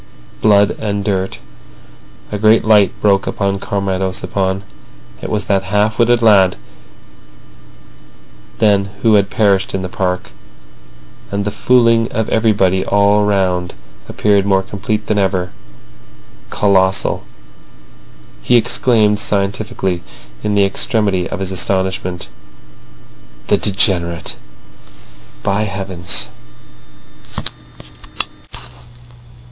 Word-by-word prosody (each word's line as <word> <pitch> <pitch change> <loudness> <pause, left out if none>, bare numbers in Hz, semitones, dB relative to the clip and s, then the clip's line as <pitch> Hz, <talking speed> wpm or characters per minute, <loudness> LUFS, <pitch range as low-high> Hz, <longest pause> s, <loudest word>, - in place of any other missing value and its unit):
Blood 100 -2 +4
and 100 -2 -2
dirt." 95 -2 -1 0.9
A 105 - -3
great 110 +1 +4
light 105 -3 +5
broke 100 -2 +3
upon 100 -1 -1
Comrade 100 -1 -2
Ossipon. 95 +1 -2 0.6
It - - -5
was 105 -2 -2
that 95 -2 0
half 105 +3 0
witted 120 0 +3
lad 95 -4 +5 2.0
then 100 -2 +3 0.2
who 115 -2 +4
had 100 -1 +3
perished 100 -3 +1
in 95 - -3
the - - -3
park. 90 0 -3 1.0
And 100 0 -2
the 105 - -1
fooling 115 -1 +3
of 110 -1 -1
everybody 100 -4 +2
all 100 +1 +3
round 90 -3 0 0.3
appeared 100 -2 +2
more 95 -1 +2
complete 105 +2 -3
than 105 -1 0
ever—colossal. 95 +2 -2 1.2
He 125 - +2
exclaimed 110 -3 +2
scientifically, 100 -2 -1 0.4
in 105 -1 -1
the 100 -1 +4
extremity 100 -2 0
of 95 - -5
his 95 0 -3
astonishment: 95 -1 -1 1.2
"The - - +4
degenerate—by 85 - -4
heavens!" 95 - -3
100 Hz, 95 wpm, -16 LUFS, 95-105 Hz, 2.0 s, light